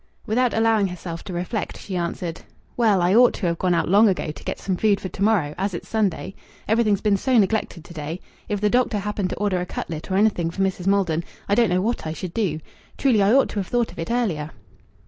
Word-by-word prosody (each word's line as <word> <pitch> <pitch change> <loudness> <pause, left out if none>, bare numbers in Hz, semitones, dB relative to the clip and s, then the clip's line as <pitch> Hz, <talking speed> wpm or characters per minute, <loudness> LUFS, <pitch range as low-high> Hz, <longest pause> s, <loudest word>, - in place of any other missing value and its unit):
Without 245 +3 +1
allowing 225 -2 +3
herself 175 -2 -7
to 195 - -6
reflect, 180 +5 -3
she 190 - -6
answered 170 -1 -3 0.3
"Well, 210 -7 +3
I 180 +2 +3
ought 245 +2 +6
to - - -4
have 170 -1 0
gone 180 -2 +2
out - - +1
long 205 +4 +6
ago 180 -5 -1
to 150 - -12
get - - -3
some 190 - -1
food 205 +1 +2
for 185 - -5
to - - -9
morrow, 195 -9 +2
as 195 -1 -1
it's - - -7
Sunday. 200 -3 -1 0.3
Everything's 215 -2 +2
been 205 -2 +2
so 255 +5 +2
neglected 205 -5 +1
to 170 - -11
day. 160 +2 -5 0.3
If 205 -2 -1
the 210 - +3
doctor 245 -3 +2
happened 205 -1 -2
to - - -4
order 200 -3 0
a - - -2
cutlet 160 0 -6
or 190 - +1
anything 195 -5 +2
for 195 +3 -2
Mrs. 190 -1 -2
Maldon, 180 -5 +2 0.2
I 200 - +1
don't 230 +1 +4
know 180 +1 +1
what 230 -6 -2
I 155 - -3
should 175 +1 -6
do. 175 -9 -1 0.4
Truly 245 -7 +3
I 200 +1 +4
ought 270 +2 +4
to 210 - -3
have 190 - -3
thought 240 -2 0
of - - -13
it 165 - -4
earlier." 195 -12 -1
195 Hz, 245 wpm, -23 LUFS, 175-220 Hz, 0.4 s, ought